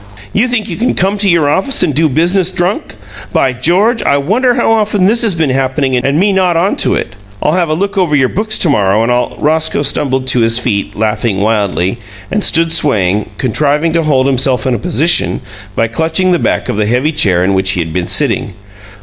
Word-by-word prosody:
You 220 +5 +2
think 245 -4 -2
you 170 - -5
can 240 +3 0
come 195 +3 0
to 200 -1 +3
your 170 -4 +2
office 190 - +1
and 160 -5 0
do 155 +3 +1
business 175 +6 +1
drunk? 185 - -2 0.4
By 130 - +1
George! 185 - +1
I 140 - +1
wonder 235 - +1
how 235 -2 +1
often 210 -3 +1
this 225 +4 +2
has 220 -7 0
been 160 -5 0
happening 130 0 0
and 140 +4 0
me 200 +2 +2
not 185 -3 +1
on 185 +4 +1
to - - +1
it! 115 - -4 0.3
I'll - - 0
have 170 -1 0
a 155 - 0
look 200 +3 -2
over 170 -5 +1
your 135 -2 +3
books 215 +1 -1
to 170 - +1
morrow, 105 -2 +2
and 120 - 0
I'll 125 0 -1
" - - -16
Roscoe 160 0 0
stumbled 135 -2 0
to 125 - +2
his 115 0 +3
feet, 110 -5 -2
laughing 105 -1 -1
wildly, 100 -1 -1 0.3
and 210 0 -1
stood 165 0 +2
swaying, 105 - +1
contriving 150 +6 0
to 170 - +2
hold 140 -4 +1
himself 130 -2 0
in 125 -3 0
position 160 - +1 0.4
by 115 - +1
clutching 160 +9 -1
the 175 - +2
back - - -1
of - - -3
the 105 -1 0
heavy 125 +7 +1
chair 90 - +1
in 95 +1 +1
which 95 0 +1
he - - -3
had 80 -2 -3
been 90 0 -2
sitting. - - -1
150 Hz, 220 wpm, -12 LUFS, 120-185 Hz, 0.4 s, to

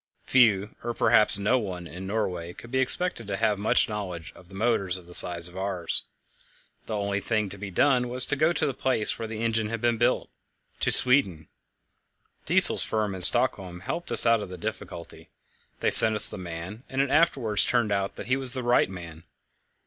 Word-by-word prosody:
Few, 105 -5 +1
or 120 0 -6
perhaps 105 -1 +3
no 105 +6 -1
one, 90 -5 -8
in 90 +3 -10
Norway 90 -5 -5
could 120 - -15
be 130 - -2
expected 130 - -1
to 100 -1 -5
have 105 -1 -2
much 105 - 0
knowledge 90 -6 -8
of 90 +1 -20
motors 95 -3 -3
of 90 - -15
the 90 - -15
size 85 -1 0
of 90 - -11
ours. 95 -3 -5 0.8
The 110 - -5
only 100 0 -3
thing 105 -1 -3
to 100 +1 -9
be 100 0 -8
done 125 +5 0
was 125 +1 -5
to 145 - -3
go 155 +3 0
to 170 - -3
the 140 - -3
place 130 -4 -3
where 115 - -6
the 110 0 -7
engine 115 -2 -2
was 115 +1 -2
built - - -2 0.5
to - - -2
Sweden. 125 - +1 1.0
Diesel's - - +3
firm 110 -3 -3
in 95 - -8
Stockholm 90 0 +4
helped 170 - -7
us - - +7
out 115 -1 +1
of 100 - -9
the 90 - -10
difficulty; 85 -4 -10 0.5
they - - -1
sent 110 -1 +11
us 105 - +11
the - - -8
man, 90 +5 -9
and 130 - -6
it 135 -1 -1
afterwards 125 -10 +1
turned 105 -3 -1
out 100 -1 -3
that - - -10
he 130 - -1
was 130 -2 0
the 130 -2 -5
right 120 -5 0
man. 85 -3 -12
105 Hz, 200 wpm, -24 LUFS, 90-120 Hz, 1.0 s, sent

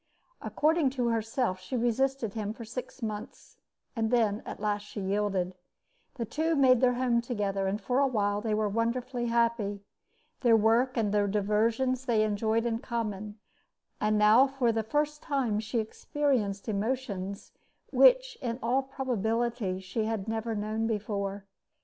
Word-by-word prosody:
According 310 -1 +2
to 245 -2 +1
herself, 225 -3 -1
she 215 +8 -4
resisted 240 -1 0
him 215 -1 -3
for 230 0 -9
six 250 +2 -7
months, 215 +1 -6 0.4
and 225 -2 0
then 220 -3 +2
at - - -6
last 205 0 -1
she 205 - -8
yielded. 195 -2 -1 0.6
The 235 - -3
two 315 +8 0
made 260 -3 +5
their 250 -1 +4
home 245 -2 +2
together, 200 -5 -2
and 200 +2 -1
for 250 +2 0
a 280 - +4
while 205 -4 0
were 215 -1 0
wonderfully 240 +3 -1
happy. 230 -4 0 0.6
Their 235 -3 +5
work 230 +4 +2
and 210 -3 +1
their 205 -1 +2
diversions 225 +6 +1
they 225 -4 +3
enjoyed 220 +2 0
in 230 -1 0
common, 215 -3 -4 0.6
and 215 0 +2
now 215 +6 +6
for 265 -3 +1
the 225 0 0
first 295 +6 -1
time 260 -8 0
she 220 +2 -3
experienced 220 -2 -1
emotions 200 -3 -3 0.4
which - - +5
in 235 -3 -2
all 250 +4 +2
probability 235 -6 -1
she 190 +4 -3
had 220 -2 -2
never 225 0 -2
known 215 +2 -1
before. 200 -2 -3
225 Hz, 150 wpm, -29 LUFS, 210-250 Hz, 0.6 s, now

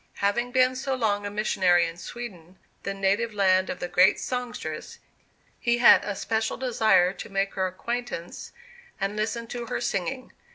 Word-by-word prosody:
Having 240 +5 0
been 255 0 +3
so 265 +1 -2
long 205 -4 0
a - - -3
missionary 185 -4 +2
in 165 0 -5
Sweden, 185 -3 -9 0.2
the 195 - -3
native 200 +3 0
land 190 -2 +3
of - - -4
the 180 - -3
great 180 +2 +4
songstress, 250 -1 -5 0.6
he 235 0 +1
had 240 - +7
a 205 -1 -3
special 220 +2 -1
desire 220 -8 +3
to - - -9
make 195 0 -1
her 190 -1 0
acquaintance 235 -1 -5 0.5
and 195 +1 -2
listen 225 +2 -2
to 240 0 -6
her 245 - -2
singing. 225 +8 -3
205 Hz, 165 wpm, -26 LUFS, 190-240 Hz, 0.6 s, had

